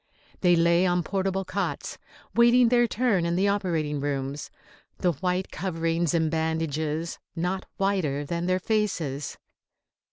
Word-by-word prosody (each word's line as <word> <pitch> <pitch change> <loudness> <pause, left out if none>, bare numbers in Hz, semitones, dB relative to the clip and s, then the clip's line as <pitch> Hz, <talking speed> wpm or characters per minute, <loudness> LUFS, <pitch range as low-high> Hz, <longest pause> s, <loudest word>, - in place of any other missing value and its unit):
They 175 -2 +4
lay 170 +2 +4
on 175 0 +1
portable 195 +1 -1
cots, 200 +2 -3 0.3
waiting 235 0 +5
their 240 0 +4
turn 220 -6 +1
in 170 0 0
the 190 +3 +2
operating 165 -7 0
rooms, 140 0 -3 0.5
the 180 - +2
white 180 +4 -2
coverings 165 -1 -1
and 160 -2 +1
bandages 160 0 -1 0.2
not 180 +3 -2
whiter 175 -8 0
than 170 +3 -2
their 185 0 +2
faces. 180 -10 -1
175 Hz, 130 wpm, -26 LUFS, 160-195 Hz, 0.5 s, waiting